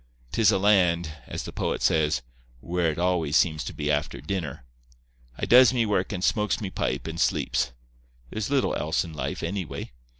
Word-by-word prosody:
'Tis 110 +5 +4
a 100 - +2
land, 90 -5 +3 0.2
as - - -5
the - - -8
poet - - -1
says, 75 -4 +2 0.4
"Where 85 +4 0
it 75 - -3
always 85 -4 +1
seems 80 -3 +2
to - - -4
be 75 +1 -2
after 75 0 -1
dinner." 85 -5 -4 0.7
I - - -2
does 125 +1 +7
me 120 -2 +2
work 100 -3 0
and 90 -3 -4
smokes 105 +2 +1
me 100 -4 -4
pipe - - -2
and 80 +1 -5
sleeps. 65 - +1 0.6
There's 110 +2 -3
little 140 -2 +1
else 80 +2 0
in 80 - -9
life, 75 - -4
anyway. 90 0 -4
90 Hz, 185 wpm, -26 LUFS, 80-100 Hz, 0.7 s, does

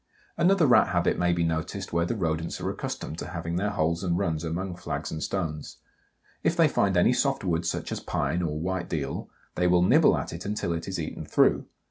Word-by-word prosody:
Another 180 -1 +4
Rat 125 - +6
habit 85 0 +1
may 90 0 +2
be 85 0 +1
noticed 85 +4 -3
where 85 0 +1
the 120 - -1
Rodents 80 -4 -2
are - - -2
accustomed 80 - -5
to - - -5
have 85 -1 -5
their 100 +4 0
holes 85 -2 0
and 85 -2 +1
runs 85 -5 -1
among 90 +3 -3
flags 90 - -4
and 80 - -4
stones. 80 -6 -3 0.6
If 165 - +1
they 165 -2 +6
find 100 -9 +1
any 90 +8 +5
soft 135 -1 0
wood 85 -2 0
such - - -3
as - - -2
pine 75 +5 -1
or 75 -3 -2
white 90 +1 -2
deal, 75 -4 -3 0.2
they 90 - +1
will 90 0 +4
nibble - - +5
at - - -4
it 85 - -6
until 100 -4 -2
it 85 0 -4
is 95 -2 -3
eaten 80 - -5
through. - - +2
85 Hz, 215 wpm, -27 LUFS, 80-95 Hz, 0.6 s, Rat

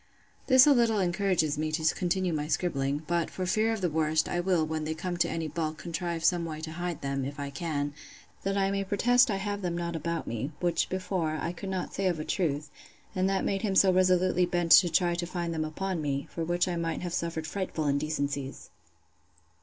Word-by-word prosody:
This 260 -1 +8
a 295 - +7
little 235 -4 +3
encourages 180 -5 +1
me 155 0 -1
to 160 0 +2
continue 180 -1 0
my 150 -1 -2
scribbling; 145 -2 -1
but, 170 0 0
for 185 - -4
fear 215 +5 +2
of 220 -3 -2
the 180 - +2
worst, 155 0 +1
I 175 - -1
will, 175 -3 +2
when 155 0 -3
they 160 +1 -2
come 175 +2 -3
to 170 0 +2
any 165 -1 -2
bulk, 155 0 -3
contrive 170 0 -4
some 175 -1 +3
way 155 -2 -5
to 160 0 -5
hide 175 0 -4
them, 140 -1 -2
if 140 +2 -5
I 140 0 -4
can, 145 -2 -2 0.5
that 195 +1 -1
I 195 0 +2
may 195 0 0
protest 245 +6 +3
I 205 - +1
have 205 +1 -3
them 175 -2 -2
not 170 -1 -3
about 165 +1 -2
me, 120 +7 -4
which, 175 -2 0
before, 185 -4 -1
I 170 - -2
could 190 +2 -7
not 185 -2 -3
say 195 -1 0
of 175 -3 0
a 155 - -4
truth; 150 -5 -1 0.4
and 185 +1 +2
that 195 -1 0
made 195 -1 0
him 200 -3 -1
so 190 -1 +6
resolutely 185 -1 +3
bent 175 -2 -1
to 180 - +8
try 175 +1 +2
to 170 0 -3
find 170 -1 -3
them 160 -1 -1
upon 180 +2 -3
me; 140 -1 -2
for 165 - -3
which 175 +2 +1
I 175 -1 -1
might 165 -1 -2
have 175 -1 -4
suffered 165 -2 -2
frightful 165 -2 -3
indecencies. 140 -1 -2
170 Hz, 225 wpm, -29 LUFS, 155-185 Hz, 0.5 s, This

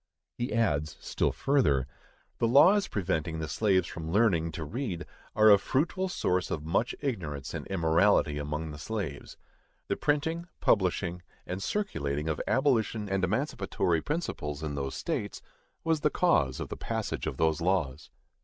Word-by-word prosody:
He 120 - -3
adds, 75 -10 0
still - - 0
further: 95 - +2 0.5
_The 115 - +2
laws 190 +9 +6
preventing 85 -4 -1
the 80 -1 -3
slaves 95 -1 +2
from 80 -1 -6
learning 85 -5 +2
to 80 - -4
read 100 - -4 0.3
are 110 0 +7
a 100 - +8
fruitful 170 - 0
source 90 - 0
of 75 -1 -3
much 95 +9 0
ignorance 85 - -3
and - - -5
immorality 80 -4 +3
among 75 +2 -3
the 75 - -9
slaves._ 90 -6 -5 0.5
The - - +1
printing, 160 +4 0
publishing, 90 -3 +1 0.2
and 95 +2 -4
circulating 75 - -2
of 80 - -1
abolition 115 -6 +1
and 95 -1 0
emancipatory 95 - 0
principles 80 - -3
in 75 -2 -3
those 70 -1 -3
states, - - -3 0.4
was 160 -1 +1
the 150 - +2
cause 80 - +2
of - - -5
the - - -5
passage - - -3
of - - -3
those 80 0 +1
laws. 80 -6 0
90 Hz, 155 wpm, -29 LUFS, 80-120 Hz, 0.5 s, a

